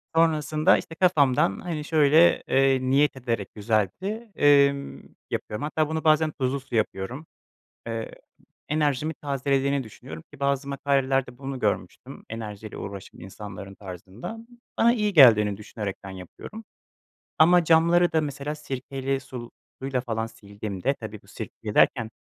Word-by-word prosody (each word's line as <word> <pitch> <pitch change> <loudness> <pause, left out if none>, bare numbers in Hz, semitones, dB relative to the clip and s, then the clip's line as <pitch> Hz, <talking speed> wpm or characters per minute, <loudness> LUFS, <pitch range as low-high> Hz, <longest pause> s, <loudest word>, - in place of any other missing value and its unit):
Sonrasında 155 -1 +3
işte 165 - -7
kafamdan 140 - +3
hani 160 -4 -4
şöyle, 155 +2 +4
ııı, 135 -1 +3
niyet 140 +2 +3
ederek 115 -6 -3
güzelce, 120 - -2
emm, 140 -1 +3 0.3
yapıyorum. 105 +7 -4
Hatta 155 0 0
bunu 160 0 -2
bazen 155 0 +4
tuzlu 135 0 -2
su 130 -2 -8
yapıyorum. 110 +6 -2 0.6
Eee, 115 -1 -4 0.6
enerjimi 150 0 0
tazelediğini 140 -1 0
düşünüyorum 80 -7 -10
ki 145 - -13
bazı 140 0 0
makalelerde 135 -2 0
bunu 135 -1 -6
görmüştüm, - - -3
enerjiyle 110 -2 -7
uğraşan 100 -1 -8
insanların 100 0 -9
tarzında. 95 - -8 0.4
Bana 235 +1 +5
iyi 210 -3 0
geldiğini 105 - +7
düşünerekten 100 -2 -6
yapıyorum 95 - -10 0.7
ama 175 +2 +6
camları 170 +2 +4
da 160 - +3
mesela 145 +1 -4
sirkeli 135 -1 -3
sul 125 -3 -9 0.3
suyla 135 -1 -1
falan 115 -2 -2
sildiğimde, 100 -3 -4
tabii - - -9
bu - - -24
sirkeyle 105 -2 -7
derken, 115 -4 +3
135 Hz, 130 wpm, -25 LUFS, 110-155 Hz, 0.7 s, geldiğini